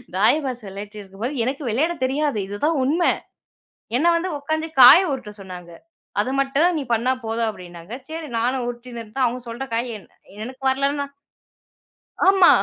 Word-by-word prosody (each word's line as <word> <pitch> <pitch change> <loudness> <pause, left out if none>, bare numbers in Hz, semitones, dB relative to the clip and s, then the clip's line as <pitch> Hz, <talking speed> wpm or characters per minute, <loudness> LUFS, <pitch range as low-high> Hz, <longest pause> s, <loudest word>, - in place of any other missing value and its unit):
தாயபாஸ் 250 +5 +2
வெளையாடிட்டு 205 +2 -8
இருக்கும்போது, 200 +7 -5
எனக்கு 270 +5 -2
வெளையாட 295 +10 +1
தெரியாது 280 -1 0
இதுதான் 290 +11 0
உண்ம. 300 +7 +1 1.0
என்ன 295 - +1
வந்து 345 +3 -1
உக்காந்து 315 +3 -2
காய 250 +7 +11
உருட்ட 250 -6 -4
சொன்னாங்க. 180 -2 -9 0.5
அது 215 +5 +1
மட்டும் 275 +5 +3
நீ - - -1
பண்ணா 235 +3 +2
போதும் 225 +1 0
அப்டின்னாங்க. 175 -1 -10 0.2
சரி 320 0 -5
நானும் 250 +2 0
உருட்டின்ட்ருந்தேன். 240 0 -3
அவுங்க 245 +1 -2
சொல்ற 240 +3 -5
காய் 240 +2 -1
என் 200 - -15 0.4
எனக்கு 255 +3 -9
வரலனா 280 +2 0 1.2
ஆமா 385 -2 +7
255 Hz, 145 wpm, -22 LUFS, 215-285 Hz, 1.2 s, காய